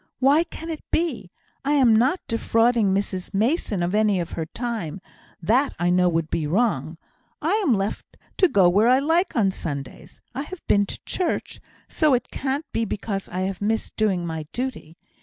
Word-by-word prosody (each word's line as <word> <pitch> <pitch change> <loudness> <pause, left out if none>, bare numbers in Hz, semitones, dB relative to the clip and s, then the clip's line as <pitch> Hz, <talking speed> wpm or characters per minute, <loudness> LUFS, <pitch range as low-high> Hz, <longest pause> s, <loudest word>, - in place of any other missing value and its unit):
Why 285 +6 +4
can 330 -1 -7
it 315 - -5
be? 315 - -1 0.3
I 285 +2 +1
am 255 -6 +5
not 260 +11 +2
defrauding 230 -2 +2
Mrs 190 -1 -2
Mason 215 - +1
of 175 +2 -1
any 210 -2 +3
of 170 - -4
her 160 -1 -4
time; 220 -7 -4 0.4
that 255 - +2
I 175 0 +1
know 180 0 +4
would 165 -2 -1
be 160 -3 -1
wrong; 165 - 0 0.4
I 315 +3 -1
am 270 - +3
left 195 +1 -4 0.2
to 370 - +5
go 195 - +4
where 200 +6 +4
I 255 +1 +6
like 325 +6 +1
on 200 -5 +3
Sundays. 140 -7 -7
I 265 - -3
have 340 +4 -9
been 205 -1 +3
to - - -6
church, 360 -3 -2 0.3
so 305 -5 +3
it 245 - -3
can't 275 +3 -2
be 230 - 0
because 200 -2 -4
I 180 +1 -3
have 190 0 -3
missed 220 +2 -1
doing 195 -5 +1
my 160 -2 -5
duty. 240 -10 -5
215 Hz, 185 wpm, -24 LUFS, 180-265 Hz, 0.4 s, I